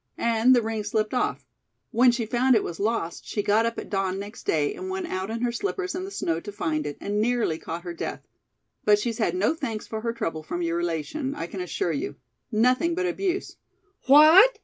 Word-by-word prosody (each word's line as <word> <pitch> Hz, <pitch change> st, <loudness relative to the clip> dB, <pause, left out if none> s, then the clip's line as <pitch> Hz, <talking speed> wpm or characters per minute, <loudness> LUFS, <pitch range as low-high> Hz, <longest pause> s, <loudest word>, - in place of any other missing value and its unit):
"And 235 Hz, +2 st, +4 dB
the 240 Hz, -, +3 dB
ring 220 Hz, -1 st, -2 dB
slipped 215 Hz, +2 st, -1 dB
off. 250 Hz, -, -1 dB, 0.5 s
When 245 Hz, +2 st, +5 dB
she 235 Hz, -1 st, -2 dB
found 245 Hz, +3 st, +3 dB
it 215 Hz, -, +3 dB
was 170 Hz, -, -6 dB
lost 205 Hz, -5 st, -1 dB
she 205 Hz, -, -3 dB
got 220 Hz, +3 st, +3 dB
up 230 Hz, -, -4 dB
at -, -, -5 dB
dawn 195 Hz, -1 st, 0 dB
next 205 Hz, +3 st, -8 dB
day 150 Hz, -2 st, +1 dB
and 375 Hz, 0 st, -6 dB
went 380 Hz, -1 st, -3 dB
out 190 Hz, -, -3 dB
in 225 Hz, +1 st, -3 dB
her 245 Hz, -1 st, +1 dB
slippers 375 Hz, -, -3 dB
in 370 Hz, +1 st, -4 dB
the -, -, -6 dB
snow 165 Hz, -, -1 dB
to 205 Hz, +4 st, -8 dB
find 155 Hz, -6 st, -2 dB
it, 145 Hz, -, -5 dB
and 205 Hz, +1 st, -1 dB
nearly 230 Hz, -8 st, +1 dB
caught 170 Hz, +1 st, -6 dB
her 175 Hz, -1 st, -5 dB
death. 165 Hz, -, -5 dB, 0.6 s
But 210 Hz, 0 st, +5 dB
she's 230 Hz, +2 st, -3 dB
had 180 Hz, -6 st, +1 dB
no 200 Hz, +10 st, +2 dB
thanks 235 Hz, -9 st, -4 dB
for 220 Hz, -1 st, -5 dB
her 230 Hz, +1 st, -1 dB
trouble 165 Hz, -9 st, -3 dB
from 175 Hz, +3 st, -4 dB
your 165 Hz, 0 st, 0 dB
relation, 175 Hz, -, -2 dB
I -, -, -4 dB
can 185 Hz, +2 st, -6 dB
assure 175 Hz, -1 st, -2 dB
you. 145 Hz, -, -3 dB, 0.4 s
Nothing 255 Hz, +9 st, +2 dB
but 370 Hz, +1 st, 0 dB
abuse 370 Hz, +1 st, -2 dB, 0.2 s
" 400 Hz, -1 st, -40 dB
"What!" 315 Hz, -, +8 dB
225 Hz, 225 wpm, -25 LUFS, 185-260 Hz, 0.6 s, What